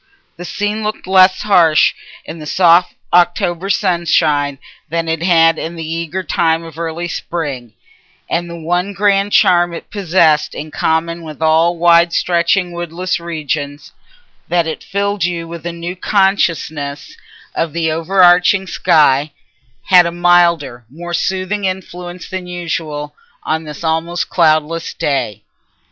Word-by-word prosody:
The 175 Hz, -, -9 dB
scene 205 Hz, +3 st, -3 dB
looked 215 Hz, 0 st, -4 dB
less 185 Hz, 0 st, +4 dB
harsh 165 Hz, -7 st, +4 dB, 0.3 s
in 165 Hz, -, -8 dB
the 150 Hz, -, -8 dB
soft 175 Hz, +1 st, +3 dB, 0.2 s
October 175 Hz, +1 st, +1 dB
sunshine 165 Hz, -7 st, +1 dB, 0.3 s
than 165 Hz, +1 st, -2 dB
it 160 Hz, 0 st, -2 dB
had 165 Hz, -2 st, +3 dB
in 170 Hz, +1 st, -5 dB
the 165 Hz, -1 st, -6 dB
eager 165 Hz, +3 st, -4 dB
time 165 Hz, -2 st, 0 dB
of 165 Hz, -1 st, -11 dB
early 170 Hz, +1 st, -4 dB
spring, 145 Hz, -9 st, -5 dB, 0.5 s
and 170 Hz, 0 st, -2 dB
the 170 Hz, -, -7 dB
one 175 Hz, +4 st, -2 dB
grand 200 Hz, +1 st, +1 dB
charm 175 Hz, -2 st, +3 dB
it -, -, -10 dB
possessed 170 Hz, -6 st, +2 dB
in 155 Hz, +1 st, -7 dB
common 165 Hz, +2 st, -1 dB
with 155 Hz, -3 st, -10 dB
all 160 Hz, +2 st, +2 dB
wide 170 Hz, 0 st, +4 dB
stretching 175 Hz, +1 st, +1 dB
woodless 175 Hz, +1 st, -3 dB
regions—that 160 Hz, -, -5 dB
it 160 Hz, -, -5 dB
filled 200 Hz, -1 st, -2 dB
you 170 Hz, -1 st, -2 dB
with 170 Hz, 0 st, -7 dB
a -, -, -3 dB
new 170 Hz, +1 st, -6 dB
consciousness 165 Hz, -7 st, -1 dB, 0.4 s
of 165 Hz, -, -2 dB
the 160 Hz, 0 st, -1 dB
overarching 180 Hz, +3 st, +3 dB
sky—had 150 Hz, -2 st, +1 dB
a -, -, -3 dB
milder, 170 Hz, -7 st, +2 dB
more 175 Hz, +5 st, -8 dB
soothing 190 Hz, +3 st, -2 dB
influence 180 Hz, -1 st, -6 dB
than 185 Hz, -1 st, -6 dB
usual, 160 Hz, -4 st, -4 dB, 0.3 s
on 160 Hz, 0 st, -2 dB
this 150 Hz, +1 st, -9 dB
almost 165 Hz, +2 st, -2 dB
cloudless 160 Hz, 0 st, +1 dB
day. 130 Hz, -8 st, -2 dB
170 Hz, 135 wpm, -16 LUFS, 160-180 Hz, 0.5 s, less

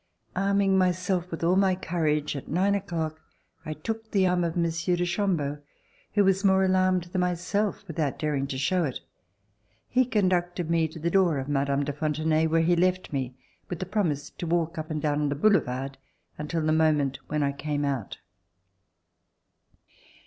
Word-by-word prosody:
Arming 195 Hz, 0 st, +2 dB
myself 180 Hz, 0 st, 0 dB
with 165 Hz, -1 st, -5 dB
all 175 Hz, +2 st, +3 dB
my 190 Hz, -1 st, +3 dB
courage, 155 Hz, -5 st, -1 dB
at 140 Hz, -, -6 dB
nine 190 Hz, +5 st, +2 dB
o'clock 160 Hz, -5 st, -3 dB, 0.4 s
I 155 Hz, -, -4 dB
took 220 Hz, +8 st, -5 dB
the 195 Hz, -3 st, +2 dB
arm 180 Hz, -1 st, +2 dB
of 170 Hz, 0 st, -2 dB
Monsieur 170 Hz, +1 st, +1 dB
de 175 Hz, 0 st, 0 dB
Chambeau, 170 Hz, -6 st, -1 dB, 0.6 s
who 205 Hz, -, +5 dB
was 195 Hz, +1 st, +2 dB
more 190 Hz, -1 st, +4 dB
alarmed 185 Hz, -1 st, +2 dB
than 175 Hz, +1 st, -2 dB
myself, 180 Hz, +4 st, -1 dB
without 155 Hz, -4 st, -2 dB
daring 145 Hz, -3 st, -1 dB
to 135 Hz, -, -4 dB
show 175 Hz, +7 st, +1 dB
it. 135 Hz, -5 st, -3 dB, 0.9 s
He 255 Hz, +1 st, +3 dB
conducted 180 Hz, -6 st, 0 dB
me 165 Hz, -1 st, +3 dB
to 160 Hz, -, -11 dB
the 170 Hz, +2 st, -1 dB
door 180 Hz, -5 st, +3 dB
of 135 Hz, 0 st, -3 dB
Mme. 140 Hz, 0 st, +1 dB
de 145 Hz, 0 st, -3 dB
Fontenay 155 Hz, +1 st, +1 dB
where 165 Hz, +1 st, +2 dB
he 175 Hz, +2 st, +3 dB
left 185 Hz, -1 st, +1 dB
me 130 Hz, -2 st, -2 dB, 0.3 s
with 175 Hz, -, -3 dB
the 185 Hz, -, -4 dB
promise 175 Hz, -8 st, -1 dB
to 175 Hz, -, -6 dB
walk 165 Hz, -1 st, 0 dB
up 155 Hz, -, -5 dB
and 155 Hz, -1 st, -2 dB
down 150 Hz, 0 st, 0 dB
on 145 Hz, -, +1 dB
the 145 Hz, -, -1 dB
boulevard 135 Hz, -7 st, +1 dB, 0.4 s
until 155 Hz, +2 st, -3 dB
the 155 Hz, -, +2 dB
moment 150 Hz, -4 st, +2 dB
when 150 Hz, 0 st, 0 dB
I 140 Hz, -, +1 dB
came 145 Hz, +1 st, -2 dB
out. 135 Hz, -8 st, -3 dB
165 Hz, 180 wpm, -27 LUFS, 150-185 Hz, 0.9 s, who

